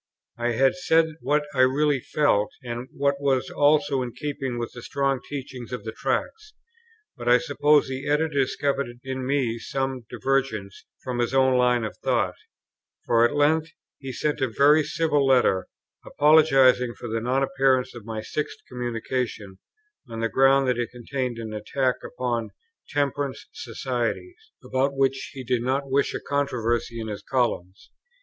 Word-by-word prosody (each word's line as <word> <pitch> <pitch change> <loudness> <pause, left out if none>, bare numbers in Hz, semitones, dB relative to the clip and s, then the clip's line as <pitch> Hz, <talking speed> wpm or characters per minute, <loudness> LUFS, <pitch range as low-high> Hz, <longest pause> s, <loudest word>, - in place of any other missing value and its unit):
I 120 0 0
had 135 +3 +3
said 165 -3 +2
what 150 +3 +1
I 135 - -3
really 140 +2 +3
felt, 115 -7 +1
and 120 +1 -5
what 140 0 0
was 135 -2 +1
also 145 -1 +3
in 120 -2 -4
keeping 135 -4 -4
with 120 0 -4
the 120 - -9
strong 135 +1 0
teaching 130 -4 -6
of 125 -5 -5
the 110 - -5
Tracts, 430 - -3 0.6
but 120 - -3
I 125 - +7
suppose 145 0 +3
the 135 +2 -4
Editor 155 +2 +2
discovered 140 0 0 0.2
in 130 -1 -4
me 130 -5 0
some 135 -1 -3
divergence 130 -8 -2 0.2
from 125 -2 -3
his 120 +2 0
own 130 -1 +4
line 125 -1 +3
of 110 - -4
thought; - - 0 0.7
for 115 -1 +4
at 120 +5 +2
length 155 +2 +2 0.3
he 135 -1 -6
sent 150 +3 -2
a 130 - +2
very 145 +6 +4
civil 150 -2 +1
letter, 125 -8 +3 0.4
apologizing 135 -5 +4
for 120 - -8
the 115 0 -2
non 130 +3 +1
appearance 135 -1 +1
of 120 -3 -10
my 110 0 -5
sixth 150 - -4
communication, 120 -4 -4 0.5
on 115 -1 -6
the 115 0 0
ground 135 +1 +4
that 125 -1 +1
it 120 - -1
contained 125 0 -4
an 110 -2 -6
attack 125 +5 -1
upon 120 -3 -3 0.4
"Temperance 145 -1 -2
Societies," 130 - -4
about 135 +1 0
which 135 0 0
he 130 - -7
did 125 -1 0
not 135 +2 -1
wish 140 +1 +1
a - - -2
controversy 120 -5 -1
in 110 - -4
his 105 -2 -5
columns. 110 -8 -2
130 Hz, 160 wpm, -25 LUFS, 120-140 Hz, 0.7 s, I